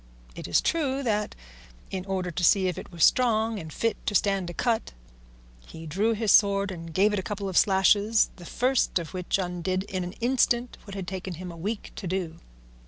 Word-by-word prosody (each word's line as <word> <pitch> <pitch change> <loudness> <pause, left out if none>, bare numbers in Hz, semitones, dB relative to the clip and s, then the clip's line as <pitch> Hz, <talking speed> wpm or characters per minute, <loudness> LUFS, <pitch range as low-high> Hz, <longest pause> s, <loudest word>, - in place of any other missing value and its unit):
It - - -7
is 85 - +3
true 280 -4 0
that, 210 -3 -1 0.6
in 190 0 -4
order 185 -2 -2
to 170 +2 -4
see 190 +2 +4
if 180 - -1
it - - -11
was 170 -2 +4
strong 225 -3 +2
and 160 -3 -8
fit 230 +6 -2
to 205 - 0
stand 195 -3 +1
a - - -6
cut, 230 - -1 0.7
he 160 0 -10
drew 200 +9 +1
his 220 -1 +1
sword 200 -1 +4
and 165 -2 -8
gave 200 +5 +3
it 205 - 0
a - - -1
couple 200 +1 -4
of 190 - -5
slashes, 205 +3 +4
the 175 - -11
first 255 -4 +1
of 170 -3 -4
which 180 0 -1
undid 185 0 -2
in 185 -2 -4
an 180 +1 -6
instant 240 0 0
what 200 -1 -9
had 190 -3 -5
taken 185 -1 -5
him 180 +2 -7
a - - -10
week 200 +6 -4
to 190 - -5
do. 170 -2 -3
195 Hz, 210 wpm, -26 LUFS, 180-215 Hz, 0.7 s, see